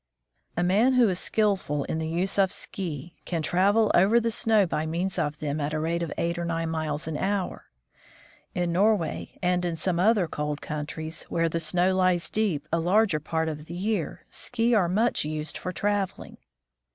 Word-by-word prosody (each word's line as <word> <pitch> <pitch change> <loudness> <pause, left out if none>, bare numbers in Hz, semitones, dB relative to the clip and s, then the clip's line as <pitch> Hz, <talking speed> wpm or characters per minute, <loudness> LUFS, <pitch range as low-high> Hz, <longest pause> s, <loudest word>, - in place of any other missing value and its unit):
A 175 - +2
man 210 +9 +4
who 250 -2 +5
is 180 -1 -1
skillful 195 -9 0
in 160 - -3
the 160 - -2
use 180 +5 -1
of 190 -2 +4
ski 170 -3 -6
can 165 -3 -2
travel 205 +6 +3
over 200 +6 +5
the 230 0 -1
snow 220 -2 +3
by 160 -2 -2
means 175 +4 -2
of 150 +1 -1
them 150 0 -3
at 145 +2 -2
a - - 0
rate 165 +2 -1
of 165 -3 -3
eight 170 +1 -1
or - - -2
nine 165 -1 -2
miles 155 -1 -2
an 160 -2 -2
hour. 195 +1 -2 0.9
In 175 -1 0
Norway 195 -1 +1
and 180 0 +2
in 175 -2 -1
some 170 +1 -1
other 205 -2 +3
cold 150 -1 -3
countries, 155 +1 -5
where 165 0 +1
the 165 - -1
snow 175 +3 +2
lies 180 -3 +2
deep 180 -9 0
a 165 - +3
larger 185 0 +3
part 160 +2 -1
of 150 -1 -5
the 170 - -7
year, 195 -3 -2
ski 240 0 0
are 190 -6 +3
much 220 +6 +2
used 155 0 -3
for 180 - -4
traveling. 200 +1 -2
175 Hz, 190 wpm, -26 LUFS, 160-195 Hz, 0.9 s, who